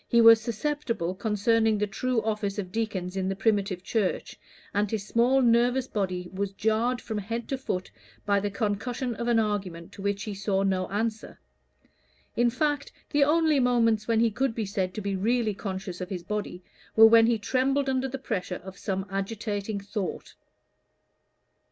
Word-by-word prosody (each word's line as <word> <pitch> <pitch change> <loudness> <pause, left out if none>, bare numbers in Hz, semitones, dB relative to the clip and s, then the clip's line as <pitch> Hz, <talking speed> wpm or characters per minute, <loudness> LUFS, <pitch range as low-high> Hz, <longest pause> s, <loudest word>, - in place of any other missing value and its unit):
He 235 - +3
was 230 -1 +8
susceptible 230 - -2
concerning 220 +2 +2
the 210 - +1
true 225 +3 -1
office 210 -2 -2
of 185 -3 -4
deacons 195 -4 -3
in 190 0 -1
the 195 - -1
primitive 195 -3 0
Church, 205 -2 -2 0.3
and 205 0 +1
his 210 -2 -3
small 245 +5 +3
nervous 245 +2 +3
body 185 -6 -2
was 195 +1 -2
jarred 220 +5 +1
from 220 -3 -4
head 230 +4 -4
to 270 - -1
foot 185 -8 -3 0.3
by 200 -1 +3
the 205 +1 -2
concussion 230 +4 -2
of 235 - -3
an 240 -1 +3
argument 195 -6 -2
to - - -11
which 200 0 -1
he 210 - -4
saw 195 0 0
no 190 -1 0
answer. 215 +2 -3 1.0
In 240 0 +3
fact, 290 +3 -1 0.2
the 290 -1 +4
only 310 0 +3
moments 230 -4 +2
when 230 -1 +3
he 230 -1 +3
could 240 +2 -1
be 225 - -2
said 190 -2 -2
to 215 - -3
be 200 -1 -2
really 220 +2 +1
conscious 190 -2 -5
of 180 - -4
his 180 -4 -5
body, 200 -2 -4 0.3
were 225 - +9
when 225 0 +7
he 235 -1 +3
trembled 270 +6 +1
under 265 0 0
the 270 +1 -5
pressure 185 -8 -3
of 190 +1 -10
some 190 -1 -2
agitating 200 +1 -3
thought. 200 0 -5
215 Hz, 175 wpm, -27 LUFS, 195-235 Hz, 1.0 s, were